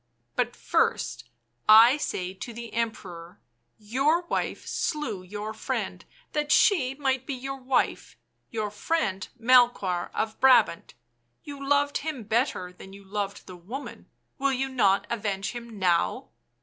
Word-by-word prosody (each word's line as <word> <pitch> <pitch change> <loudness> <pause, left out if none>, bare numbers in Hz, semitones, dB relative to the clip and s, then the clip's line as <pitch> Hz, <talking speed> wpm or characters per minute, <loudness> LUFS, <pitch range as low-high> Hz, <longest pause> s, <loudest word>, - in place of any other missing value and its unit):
But - - 0
first 120 0 0 0.4
I 230 +5 +9
say 185 -10 -3
to 210 +5 -8
the 235 0 -8
Emperor 185 -7 -4 0.2
— 120 - -48 0.2
your 305 +6 +3
wife - - -2
slew 245 - -2
your 205 +3 -6
friend 220 - -4 0.3
that 300 0 -1
she 270 - +4
might 265 -2 -1
be 275 - -2
your 270 +2 -5
wife, 255 0 0 0.3
your 215 -3 -3
friend 210 - -1
Melchoir 235 -7 +3
of 220 0 -2
Brabant 240 -10 +4 0.2
— 120 0 -47
you 285 -1 -8
loved 285 +1 +2
him 295 -5 -4
better 215 -5 -1
than 190 +1 -13
you 200 0 -13
loved 200 0 -4
the 185 - -10
woman 220 +11 -8
— - - -48
will 275 0 +2
you 265 +1 -1
not 200 -7 +2
avenge 200 -3 -2
him 235 -2 -8
now?" 175 -3 +1
230 Hz, 150 wpm, -27 LUFS, 195-270 Hz, 0.4 s, I